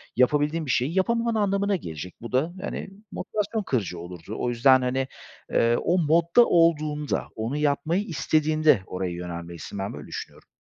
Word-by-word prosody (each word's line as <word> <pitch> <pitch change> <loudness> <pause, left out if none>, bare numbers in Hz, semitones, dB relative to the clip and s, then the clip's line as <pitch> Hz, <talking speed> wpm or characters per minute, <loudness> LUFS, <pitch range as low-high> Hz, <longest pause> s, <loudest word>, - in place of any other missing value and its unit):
yapabildiğin 150 +5 +2
bir 135 - -1
şeyi 140 +11 0
yapamaman 230 +4 +1
anlamına 200 -1 +1
gelecek. 85 - -7
Bu 120 - -7
da, 145 +7 +1
hani, 200 - -5 0.2
motivasyon 215 +1 -2
kırıcı 100 - -2
olurdu. 90 +4 -8
O 125 - 0
yüzden, 130 +2 +5
hani, 130 +1 0 0.4
eee, 115 0 +3
o 175 - +2
modda 170 +7 +4
olduğunda, 155 -4 +2
onu 115 +6 -2
yapmayı 150 +5 +1
istediğinde 155 - +2
oraya 90 -1 -3
yönelmelisin. 85 +1 -6
Ben 95 +1 -3
böyle 75 0 -9
düşünüyorum. - - -8
145 Hz, 155 wpm, -25 LUFS, 110-170 Hz, 0.4 s, yüzden